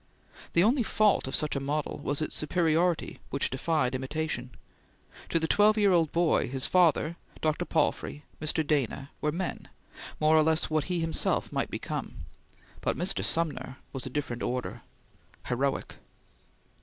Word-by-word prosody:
The 170 Hz, -, +5 dB
only 245 Hz, +6 st, +4 dB
fault 215 Hz, -, +2 dB
of 135 Hz, -, -1 dB
such 150 Hz, -1 st, 0 dB
a -, -, +1 dB
model 145 Hz, +2 st, -2 dB
was 145 Hz, +2 st, -1 dB
its -, -, -3 dB
superiority 165 Hz, +1 st, +1 dB
which 140 Hz, -, 0 dB
defied 135 Hz, -1 st, 0 dB
imitation. 130 Hz, -1 st, -3 dB, 0.8 s
To -, -, +2 dB
the 160 Hz, -, 0 dB
twelve 210 Hz, +4 st, +4 dB
year 205 Hz, -2 st, +4 dB
old 165 Hz, -4 st, +3 dB
boy, 170 Hz, -5 st, +2 dB
his 130 Hz, 0 st, -1 dB
father, 170 Hz, -2 st, +3 dB, 0.2 s
Dr. 155 Hz, +3 st, 0 dB
Palfrey, 150 Hz, -2 st, 0 dB, 0.2 s
Mr. 155 Hz, 0 st, 0 dB
Dana, 140 Hz, -2 st, -1 dB
were 150 Hz, -, +1 dB
men, 180 Hz, +4 st, -4 dB, 0.5 s
more 155 Hz, +1 st, +4 dB
or 155 Hz, -, +7 dB
less 160 Hz, +1 st, +2 dB
like -, -, -4 dB
what 155 Hz, -1 st, +2 dB
he 180 Hz, -2 st, -1 dB
himself 165 Hz, 0 st, 0 dB
might -, -, -1 dB
become; -, -, -4 dB, 0.7 s
but -, -, 0 dB
Mr. 185 Hz, +3 st, -1 dB
Sumner 150 Hz, -5 st, 0 dB, 0.2 s
was 135 Hz, -1 st, -3 dB
a -, -, -4 dB
different 125 Hz, -3 st, -3 dB
order 125 Hz, 0 st, -3 dB, 0.6 s
heroic. 135 Hz, +3 st, -1 dB
155 Hz, 155 wpm, -29 LUFS, 140-170 Hz, 0.8 s, or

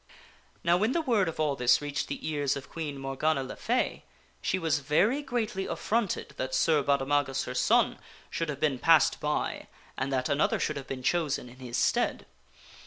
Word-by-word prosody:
Now 170 Hz, 0 st, +4 dB
when 215 Hz, +7 st, +1 dB
the 335 Hz, -, +1 dB
word 230 Hz, -, +2 dB
of 160 Hz, -, -8 dB
all 150 Hz, -2 st, +1 dB
this 125 Hz, -2 st, +4 dB
reached 145 Hz, -1 st, -3 dB
the 140 Hz, -, -5 dB
ears 145 Hz, -3 st, 0 dB
of 140 Hz, -1 st, -8 dB
Queen 150 Hz, -4 st, -4 dB
Morgana 135 Hz, +2 st, 0 dB
le 130 Hz, -, -7 dB
Fay -, -, -1 dB, 0.4 s
she 185 Hz, -, 0 dB
was 160 Hz, -5 st, +1 dB
greatly 215 Hz, -, 0 dB
affronted 220 Hz, -3 st, -1 dB
that 130 Hz, 0 st, -2 dB
Sir 155 Hz, -3 st, +3 dB
Baudemagus, 140 Hz, 0 st, +1 dB
her -, -, -5 dB
son, -, -, +2 dB, 0.3 s
should 165 Hz, -2 st, -2 dB
have 140 Hz, -2 st, -4 dB
been 145 Hz, -4 st, +1 dB
passed 165 Hz, +2 st, +5 dB
by 150 Hz, 0 st, -2 dB, 0.3 s
and 135 Hz, -, -2 dB
that 130 Hz, -1 st, 0 dB
another 145 Hz, +1 st, +1 dB
should 150 Hz, -, -1 dB
have 135 Hz, -, -7 dB
been 130 Hz, -1 st, -5 dB
chosen 150 Hz, -5 st, 0 dB
in 125 Hz, -, -15 dB
his 125 Hz, -2 st, -5 dB
stead. -, -, +1 dB
150 Hz, 180 wpm, -29 LUFS, 135-170 Hz, 0.4 s, passed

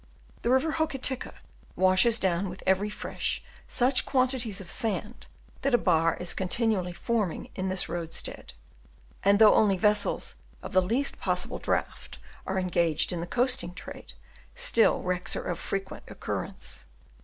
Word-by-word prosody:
The -, -, -1 dB
river 265 Hz, +5 st, +3 dB
Hokitika 275 Hz, -5 st, -1 dB, 0.4 s
washes 190 Hz, +5 st, +4 dB
down 190 Hz, -2 st, 0 dB
with 180 Hz, +1 st, -9 dB
every 190 Hz, +2 st, +2 dB
fresh 210 Hz, -, -3 dB, 0.2 s
such 255 Hz, +1 st, +3 dB
quantities 255 Hz, -6 st, +1 dB
of 185 Hz, -3 st, -6 dB
sand, 220 Hz, -1 st, -2 dB, 0.3 s
that 275 Hz, -3 st, +3 dB
a -, -, +6 dB
bar 165 Hz, -6 st, +2 dB
is 180 Hz, -1 st, -2 dB
continually 190 Hz, -1 st, -1 dB
forming 205 Hz, -1 st, -2 dB
in 190 Hz, 0 st, -3 dB
this 185 Hz, 0 st, +1 dB
roadstead, 165 Hz, -1 st, -4 dB, 0.7 s
and 200 Hz, +1 st, +5 dB
though 215 Hz, 0 st, +7 dB
only 200 Hz, -3 st, +4 dB
vessels 210 Hz, +2 st, +1 dB, 0.3 s
of -, -, -7 dB
the 185 Hz, -, +5 dB
least 235 Hz, +10 st, -1 dB
possible -, -, -1 dB
draught -, -, -3 dB, 0.3 s
are 190 Hz, -, -1 dB
engaged 170 Hz, -3 st, +1 dB
in 170 Hz, -, -3 dB
the 170 Hz, -, -5 dB
coasting 245 Hz, -6 st, 0 dB
trade, -, -, -9 dB, 0.4 s
still 485 Hz, -, +3 dB
wrecks 180 Hz, 0 st, 0 dB
are -, -, -3 dB
of 175 Hz, -1 st, -3 dB
frequent 195 Hz, -1 st, -5 dB
occurrence. -, -, -4 dB
195 Hz, 145 wpm, -28 LUFS, 180-240 Hz, 0.7 s, though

